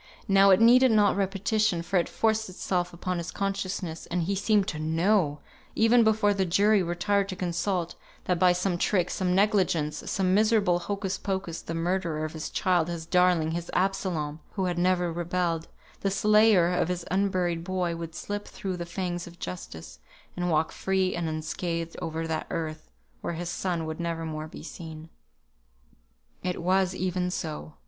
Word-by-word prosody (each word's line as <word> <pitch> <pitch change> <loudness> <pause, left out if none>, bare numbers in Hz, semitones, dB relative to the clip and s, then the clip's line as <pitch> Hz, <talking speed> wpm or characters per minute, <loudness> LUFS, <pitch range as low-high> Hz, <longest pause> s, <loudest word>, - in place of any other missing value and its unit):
Now 195 -1 +6
it 190 0 +6
needed 250 +3 +7
not 210 -3 +4
repetition, 195 -1 0
for 190 +2 0
it 170 - -1
forced 220 -2 0
itself 180 -1 -2
upon 180 +1 -3
his 170 - -5
consciousness, 195 -4 -3
and 175 0 -1
he 195 +4 -1
seemed 205 0 +2
to 150 - -5
know, 160 -1 +1 0.3
even 230 +2 +5
before 215 -2 +3
the 195 -1 +1
jury 200 +3 +3
retired 195 +3 0
to 185 - -4
consult, 175 0 -1 0.3
that 180 -2 0
by 180 0 +6
some 180 0 0
trick, 185 -2 +1
some 180 -1 0
negligence, 185 -7 +2
some 185 -2 +1
miserable 210 -4 +3
hocus 195 +1 -3
pocus, 190 -4 -3
the 165 - -5
murderer 165 -2 -1
of 155 - -6
his 160 -1 -5
child, 180 -4 +1
his 170 -2 -5
darling, 180 -2 +3
his 170 +1 -4
Absalom, 180 -6 -1
who 190 -2 -1
had 175 -1 -1
never 180 -1 +2
rebelled, 170 -1 -1 0.3
the 200 - 0
slayer 210 -3 +4
of 175 - +1
his 180 -1 -3
unburied 185 -3 0
boy 180 -2 -1
would 165 -1 -7
slip 205 0 -5
through 190 -2 -5
the 170 -1 -5
fangs 175 -1 -3
of 175 0 -13
justice, 80 - -8 0.4
and 175 0 -1
walk 160 -1 +1
free 190 -1 0
and 170 -2 -2
unscathed 165 +1 -3
over 165 0 -3
that 160 -1 -3
earth 155 -1 -4 0.3
where - - -3
his 170 +1 -4
son 175 -4 -2
would 160 +1 -5
never 165 -1 -2
more 155 -1 -5
be - - -10
seen. 160 -2 -9 1.3
It 180 -1 -2
was 185 +1 +1
even 180 0 -1
so. 155 -3 -5
180 Hz, 170 wpm, -27 LUFS, 165-195 Hz, 1.3 s, needed